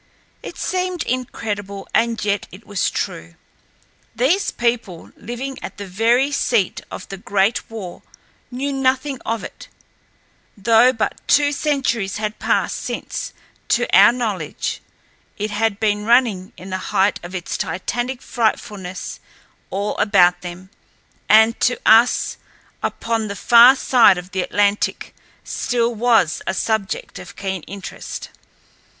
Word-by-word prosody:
It - - -9
seemed 365 -2 -2
incredible, 205 -5 -4
and 230 -2 +1
yet 200 -3 0
it 195 +5 -13
was 200 -3 0
true. 80 +1 -5 0.8
These 290 - +2
people 235 -8 -2
living 255 +4 -6
at - - -8
the 200 - -6
very 230 +8 +2
seat 235 -8 +1
of - - -8
the 195 - -6
Great 200 +3 0
War 210 -6 -8 0.5
knew 275 +3 -3
nothing 270 0 0
of 230 0 -1
it, - - -10 0.9
though 225 +5 +5
but 225 -4 -3
two 290 0 +4
centuries 265 -9 -1
had 215 0 -4
passed - - 0
since, - - -5 0.4
to - - +2
our - - +8
knowledge, 210 -11 -3 0.6
it 210 +1 -3
had 210 0 0
been 210 -1 +1
running 225 -5 +2
in 185 +1 -10
the 185 - -2
height 195 0 +2
of 175 +2 -8
its 180 - -4
titanic 240 +8 -3
frightfulness 205 -6 -3 0.5
all 200 +2 -2
about 180 -4 +4
them, 180 +2 -9 0.6
and 220 +2 +6
to 245 - +1
us 225 +3 +4 0.4
upon 225 -1 -2
the 200 - -5
far 240 +5 +7
side 240 -7 +5
of 180 +1 -8
the 190 - -1
Atlantic 205 +2 0 0.3
still 235 -1 -1
was 225 -7 +2
a 190 - -1
subject 220 -3 -2
of - - -11
keen 190 -2 -4
interest. 200 0 -7
220 Hz, 130 wpm, -20 LUFS, 195-245 Hz, 0.9 s, our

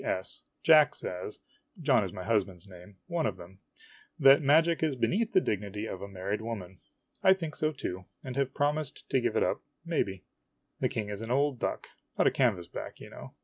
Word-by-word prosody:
S. 95 - -3 0.2
Jack 155 -3 +6
says 90 +3 -5 0.4
(John 135 -8 +3
is 95 - -4
my 90 - -7
husband's 100 -4 -1
name 95 +1 -14
one 170 -4 0
of - - -3
them) 95 +2 -13 0.6
that 135 -2 +7
magic 160 +4 +4
is 155 -4 +1
be 125 - +1
neath 225 +4 0
the - - +7
dignity 105 - -3
of 95 -4 -6
a 100 - -5
married 100 +2 -3
woman. 95 -6 -6 0.4
I 190 0 +6
think 165 -5 -5
so, 155 0 +1
too, 95 -10 -5 0.2
and 130 -1 -5
have 140 -1 -1
promised 145 0 -1
to 130 - +3
give 120 -2 0
it - - +3
up, - - 0 0.2
maybe. 100 - -1 0.6
The - - +1
King 105 -2 -3
is 105 0 -5
an 115 - -6
old 135 0 +1
duck - - -2 0.3
not - - +3
a - - +5
canvasback, 100 -10 -1
you - - -11
kno\v. - - -10
115 Hz, 200 wpm, -30 LUFS, 95-150 Hz, 0.6 s, that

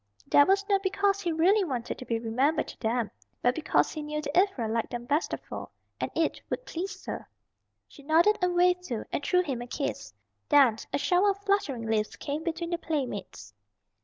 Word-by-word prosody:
That 285 - +6
was 395 +1 +3
not 395 -1 +3
because 395 +1 +1
he 350 -3 -1
really 370 +6 +4
wanted 255 -9 -3
to 255 - -7
be 230 - 0
remembered 255 +8 +1
to - - -11
them 225 -2 -1 0.3
but 245 - +4
because 315 - +1
he 310 - -5
knew 300 0 -3
that 295 -1 -4
Ivra 360 - +2
liked 225 +1 -1
them 240 -1 -5
best 295 +6 0
of - - -3
all, - - -6 0.3
and - - -1
it 325 -1 0
would - - -3
please 380 +3 -5
her. - - -6 0.6
She - - -15
nodded 330 +9 +4
and 360 -1 +1
waved 360 0 +4
too, 235 -8 -4
and - - -2
threw 360 +3 +3
him 265 -7 -3
a 240 - -6
kiss. - - -4 0.4
Then 275 -7 +6
a - - +1
shower 360 +6 +3
of 400 0 -2
fluttering 310 - 0
leaves 220 -1 0
came 295 +2 -4
between 335 0 -3
the 345 - -1
playmates. 240 - -4
310 Hz, 205 wpm, -28 LUFS, 245-360 Hz, 0.6 s, That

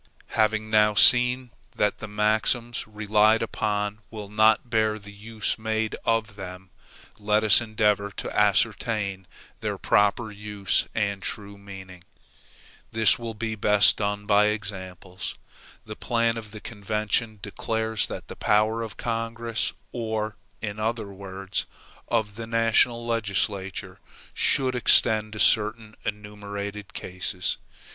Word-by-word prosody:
Having 110 0 +1
now 105 -1 +4
seen 125 +3 +5 0.2
that 105 - 0
the 110 - -6
maxims 110 +3 0
relied 110 +1 +3
upon 105 -1 -2
will 105 -3 -8
not 110 +3 +3
bear 110 -2 +1
the 100 -1 -12
use 110 +1 -2
made 110 0 -1
of 115 -3 0
them, 95 -1 -9 0.5
let 105 +1 +2
us 110 +2 +6
endeavor 105 -2 +1
to - - -6
ascertain 100 -4 +1 0.3
their - - -3
proper 105 +3 +2
use 105 -3 -1
and 100 -2 -1
true 100 0 -5
meaning. 95 -3 -11 0.9
This 110 -1 +5
will 115 -1 -5
be 110 0 -3
best 105 -1 +4
done 105 0 -2
by 105 0 +4
examples. 95 -3 -5 0.5
The 110 - -7
plan 115 0 0
of 110 -2 -7
the 105 0 -10
convention 110 +1 -2
declares 110 +2 -2
that - - -7
the - - -8
power 110 +2 +2
of 115 -2 -6
Congress, 115 0 -2 0.2
or, 110 -3 -3 0.3
in 105 0 -4
other 110 -2 -2
words, 95 0 -5 0.4
of 110 -3 -1
the 115 -1 -6
national 115 +1 +3
legislature, 100 -4 -2 0.3
shall 135 -2 +3
extend 110 -3 +3
to 110 - -7
certain 110 +1 +2
enumerated 105 -1 -6
cases. 90 0 -3
105 Hz, 125 wpm, -25 LUFS, 100-110 Hz, 0.9 s, us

